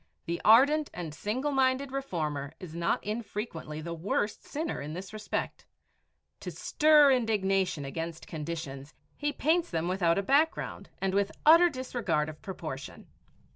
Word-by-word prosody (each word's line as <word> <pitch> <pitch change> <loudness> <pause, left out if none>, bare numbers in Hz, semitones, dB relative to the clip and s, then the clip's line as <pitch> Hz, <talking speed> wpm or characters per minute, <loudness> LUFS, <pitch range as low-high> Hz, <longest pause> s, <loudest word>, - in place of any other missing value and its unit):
The 170 +1 -3
ardent 285 +7 +6
and 165 -4 -5
single 235 - -2
minded 265 0 +1
reformer 155 - -3
is 175 -4 -9
not 170 0 0
infrequently 210 -8 -5
the 170 +1 -5
worst 200 +5 -2
sinner 310 +2 -4
in 150 +2 -6
this 185 +4 -7
respect. 215 -1 -4 0.7
To - - -6
stir 300 -2 +5
indignation 195 - +1
against 165 +3 -5
conditions, 150 -3 -6 0.2
he 295 0 -1
paints 325 +4 +1
them 165 0 -1
without 175 -2 +2
a 200 - +1
background 290 +9 +1
and 195 -1 -1
with 200 0 +1
utter 335 +3 +8
disregard 245 - -1
of 155 0 -11
proportion. 155 -8 -7
195 Hz, 140 wpm, -29 LUFS, 160-265 Hz, 0.7 s, utter